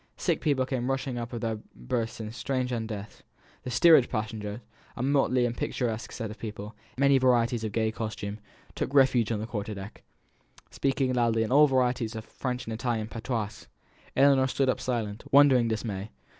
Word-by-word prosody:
Sick -, -, 0 dB
people 140 Hz, -4 st, +1 dB
came 125 Hz, -1 st, -2 dB
rushing 135 Hz, -2 st, -2 dB
up 115 Hz, -1 st, -4 dB
out 120 Hz, -, -7 dB
of 115 Hz, -, -5 dB
their 110 Hz, -2 st, -2 dB, 0.2 s
berths 115 Hz, -, -3 dB
in 110 Hz, -1 st, -5 dB
strange 130 Hz, +1 st, -2 dB
undress; 110 Hz, -3 st, -5 dB, 0.4 s
the -, -, -6 dB
steerage 130 Hz, +1 st, +6 dB
passengers 110 Hz, -1 st, -4 dB, 0.4 s
a 120 Hz, -, -2 dB
motley 135 Hz, -2 st, +2 dB
and 120 Hz, 0 st, -2 dB
picturesque 115 Hz, -3 st, -2 dB
set 115 Hz, -3 st, -5 dB
of 110 Hz, -, -11 dB
people, 105 Hz, -1 st, -7 dB, 0.2 s
in -, -, -3 dB
many 140 Hz, -1 st, +5 dB
varieties 120 Hz, -2 st, +2 dB
of 110 Hz, -, -2 dB
gay 110 Hz, +1 st, 0 dB
costume 110 Hz, -2 st, -5 dB, 0.3 s
took 145 Hz, -, -3 dB
refuge 130 Hz, -5 st, +4 dB
on 110 Hz, -, -1 dB
the 110 Hz, -, -3 dB
quarter 105 Hz, -2 st, -4 dB
deck, 95 Hz, +1 st, -9 dB, 0.7 s
speaking 135 Hz, -1 st, 0 dB
loudly 115 Hz, -2 st, +2 dB
in 110 Hz, -, -3 dB
all 150 Hz, +3 st, +7 dB
varieties 125 Hz, -4 st, 0 dB
of 110 Hz, 0 st, -6 dB
French 125 Hz, -1 st, -4 dB
and 115 Hz, -, -4 dB
Italian 110 Hz, -1 st, -2 dB
patois. 115 Hz, -2 st, -4 dB, 0.5 s
Ellinor 135 Hz, -1 st, +5 dB
stood 135 Hz, 0 st, +1 dB
up -, -, +1 dB
in -, -, -9 dB
silent, 115 Hz, -4 st, -2 dB
wondering 135 Hz, -4 st, +6 dB
dismay. 110 Hz, -2 st, -3 dB
120 Hz, 185 wpm, -28 LUFS, 110-130 Hz, 0.7 s, all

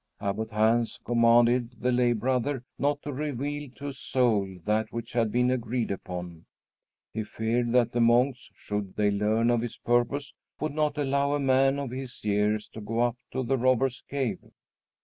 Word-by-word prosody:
Abbot 105 Hz, +2 st, -2 dB
Hans 115 Hz, +2 st, +2 dB
commanded 120 Hz, +1 st, +3 dB
the 125 Hz, +1 st, +1 dB
lay 120 Hz, -1 st, +3 dB
brother 125 Hz, +3 st, -1 dB, 0.2 s
not 145 Hz, 0 st, 0 dB
to 145 Hz, -, -4 dB
reveal 145 Hz, +1 st, -3 dB
to 145 Hz, +1 st, -5 dB
a -, -, -6 dB
soul 110 Hz, -8 st, 0 dB
that 110 Hz, +1 st, 0 dB
which 115 Hz, 0 st, -6 dB
had 115 Hz, -3 st, +1 dB
been 125 Hz, +2 st, +2 dB
agreed 120 Hz, -2 st, -1 dB
upon. 90 Hz, -3 st, -6 dB, 0.7 s
He 110 Hz, -, -2 dB
feared 115 Hz, +3 st, -1 dB
that 125 Hz, -2 st, +4 dB
the 120 Hz, -, 0 dB
monks, 125 Hz, +3 st, +3 dB
should 105 Hz, -2 st, -4 dB
they 105 Hz, -1 st, +2 dB
learn 110 Hz, +3 st, +2 dB
of 120 Hz, -1 st, +2 dB
his 120 Hz, -1 st, -5 dB
purpose, 120 Hz, +4 st, 0 dB, 0.3 s
would 155 Hz, -1 st, -2 dB
not 150 Hz, -1 st, 0 dB
allow 140 Hz, 0 st, +1 dB
a -, -, -1 dB
man 135 Hz, 0 st, +3 dB
of 140 Hz, -3 st, -4 dB
his 130 Hz, -1 st, -7 dB
years 105 Hz, 0 st, +1 dB
to 110 Hz, -, -9 dB
go 115 Hz, +3 st, -1 dB
up 120 Hz, -1 st, +2 dB, 0.2 s
to 130 Hz, -, -2 dB
the 130 Hz, +2 st, 0 dB
Robbers' 130 Hz, 0 st, +2 dB
Cave. 130 Hz, -8 st, -1 dB
120 Hz, 175 wpm, -27 LUFS, 110-130 Hz, 0.7 s, that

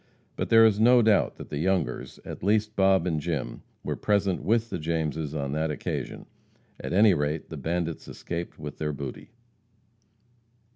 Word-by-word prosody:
But -, -, -3 dB
there 115 Hz, 0 st, +7 dB
is 105 Hz, -2 st, +3 dB
no 120 Hz, +2 st, +6 dB
doubt 110 Hz, -2 st, +3 dB
that -, -, -10 dB
the 70 Hz, -, -3 dB
Youngers 90 Hz, -1 st, -1 dB
at -, -, -7 dB
least 105 Hz, +2 st, +1 dB
Bob 95 Hz, -2 st, +4 dB
and 80 Hz, -4 st, 0 dB
Jim 80 Hz, -4 st, -3 dB, 0.2 s
were -, -, -2 dB
present 100 Hz, -3 st, +1 dB
with 115 Hz, +1 st, +1 dB
the -, -, -3 dB
Jameses 80 Hz, -1 st, -2 dB
on 70 Hz, -2 st, -2 dB
that 80 Hz, +2 st, -1 dB
occasion. 75 Hz, -, -4 dB, 0.5 s
At -, -, -5 dB
any 100 Hz, +2 st, +6 dB
rate, 75 Hz, 0 st, -2 dB
the 80 Hz, -, -6 dB
bandits 85 Hz, +2 st, -3 dB
escaped 85 Hz, 0 st, -6 dB
with 75 Hz, -1 st, -8 dB
their 75 Hz, -1 st, -1 dB
booty. 70 Hz, -2 st, -7 dB
85 Hz, 165 wpm, -27 LUFS, 75-100 Hz, 0.5 s, there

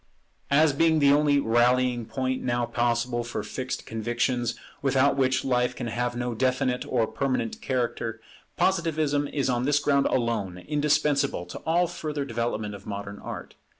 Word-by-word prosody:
As 150 Hz, +1 st, +4 dB
being 160 Hz, +2 st, +3 dB
the 140 Hz, -2 st, +5 dB
only 145 Hz, -1 st, +4 dB
rallying 120 Hz, 0 st, +2 dB
point 130 Hz, -1 st, -2 dB
now 120 Hz, -1 st, 0 dB
possible 120 Hz, 0 st, 0 dB
for 120 Hz, -, -4 dB
fixed 130 Hz, -1 st, -5 dB
convictions, 120 Hz, +2 st, -1 dB, 0.3 s
without 135 Hz, 0 st, +3 dB
which 130 Hz, -1 st, +1 dB
life 125 Hz, -1 st, +1 dB
can -, -, -5 dB
have 120 Hz, +1 st, -2 dB
no 120 Hz, 0 st, -2 dB
definite 130 Hz, +1 st, 0 dB
or 120 Hz, -3 st, +3 dB
permanent 135 Hz, -, -2 dB
character, 120 Hz, -3 st, -2 dB, 0.4 s
Positivism 155 Hz, -5 st, +1 dB
is 140 Hz, -1 st, -1 dB
on 125 Hz, -1 st, 0 dB
this 145 Hz, +1 st, +3 dB
ground 140 Hz, -1 st, +2 dB
alone 115 Hz, -7 st, -1 dB
indispensable 145 Hz, -, +1 dB
to -, -, -8 dB
all 170 Hz, +2 st, +3 dB
further 155 Hz, -4 st, -4 dB
development 115 Hz, -4 st, -2 dB
of 100 Hz, -1 st, -11 dB
modern 100 Hz, 0 st, -6 dB
Art. -, -, -7 dB
130 Hz, 150 wpm, -26 LUFS, 120-145 Hz, 0.4 s, the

